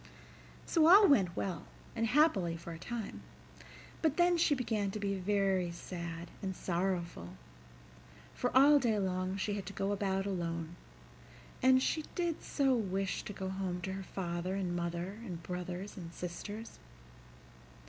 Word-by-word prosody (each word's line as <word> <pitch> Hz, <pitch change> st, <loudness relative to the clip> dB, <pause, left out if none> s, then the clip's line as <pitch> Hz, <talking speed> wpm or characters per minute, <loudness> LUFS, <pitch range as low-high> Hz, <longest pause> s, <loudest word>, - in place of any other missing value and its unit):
So 320 Hz, -2 st, +4 dB
all 395 Hz, +4 st, +9 dB
went 195 Hz, -, +4 dB
well 185 Hz, -3 st, -3 dB, 0.3 s
and 230 Hz, 0 st, +1 dB
happily 215 Hz, -, +3 dB
for 170 Hz, 0 st, -8 dB
a 165 Hz, -, -9 dB
time, 215 Hz, -, -5 dB, 0.8 s
but 315 Hz, -2 st, +2 dB
then 350 Hz, 0 st, +5 dB
she 325 Hz, -3 st, +3 dB
began 220 Hz, -6 st, -1 dB
to 210 Hz, -, -4 dB
be 200 Hz, -1 st, -1 dB
very 195 Hz, -1 st, +1 dB
sad 170 Hz, -1 st, -6 dB
and 190 Hz, -2 st, -3 dB
sorrowful, 175 Hz, -, -2 dB, 1.0 s
for -, -, -1 dB
all 285 Hz, +2 st, +8 dB
day 230 Hz, -5 st, +1 dB
long 185 Hz, -1 st, -1 dB
she 205 Hz, +1 st, -1 dB
had 200 Hz, -3 st, -4 dB
to 200 Hz, -, -6 dB
go 195 Hz, +1 st, -1 dB
about 195 Hz, -1 st, 0 dB
alone; 170 Hz, -3 st, -3 dB, 0.9 s
and 260 Hz, 0 st, +5 dB
she 310 Hz, -, 0 dB
did 345 Hz, -3 st, -1 dB
so 275 Hz, -2 st, +2 dB
wish 195 Hz, -4 st, -1 dB
to -, -, -5 dB
go 190 Hz, -1 st, -4 dB
home 190 Hz, -2 st, -2 dB
to 190 Hz, +1 st, -3 dB
her 195 Hz, -, -4 dB
father 180 Hz, -1 st, -3 dB
and 185 Hz, -3 st, -1 dB
mother 175 Hz, +4 st, -3 dB
and 175 Hz, -7 st, -6 dB
brothers 180 Hz, +2 st, -5 dB
and 170 Hz, -3 st, -8 dB
sisters. 205 Hz, +6 st, -7 dB
195 Hz, 155 wpm, -33 LUFS, 175-225 Hz, 1.0 s, all